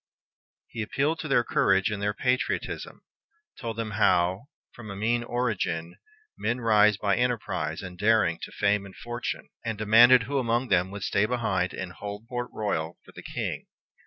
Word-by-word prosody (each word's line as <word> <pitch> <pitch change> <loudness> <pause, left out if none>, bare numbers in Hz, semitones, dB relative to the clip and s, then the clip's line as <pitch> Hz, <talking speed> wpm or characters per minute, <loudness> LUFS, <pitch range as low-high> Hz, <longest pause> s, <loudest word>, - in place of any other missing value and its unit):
He 115 - -6
appealed 140 +9 0
to 155 - -4
their 135 -4 +3
courage 95 -2 +2
and 105 -1 -3
their 105 0 0
patriotism, 125 +2 -2 0.6
told 115 -2 -5
them 115 -1 -3
how, 95 +1 +2 0.2
from 115 -3 -11
a 100 - -6
mean 115 +4 0
origin, 105 -9 -2 0.4
men 120 +3 -1
rise 105 -3 +4
by 100 -1 +1
enterprise 110 -10 -1
and 90 -1 -9
daring 105 -6 +3
to - - -7
fame 100 -1 +1
and 95 - -14
fortune, 120 0 -5
and 115 -2 -3
demanded 115 +4 +7
who 140 +4 -1
among 120 0 0
them 95 -1 +3
would 100 0 -7
stay 100 +2 +2
behind 100 -7 -1
and 95 -1 -5
hold 105 +3 -7
Port 120 0 -4
Royal 85 -6 -2
for - - -15
the - - -11
King. - - -4
110 Hz, 170 wpm, -27 LUFS, 100-120 Hz, 0.6 s, demanded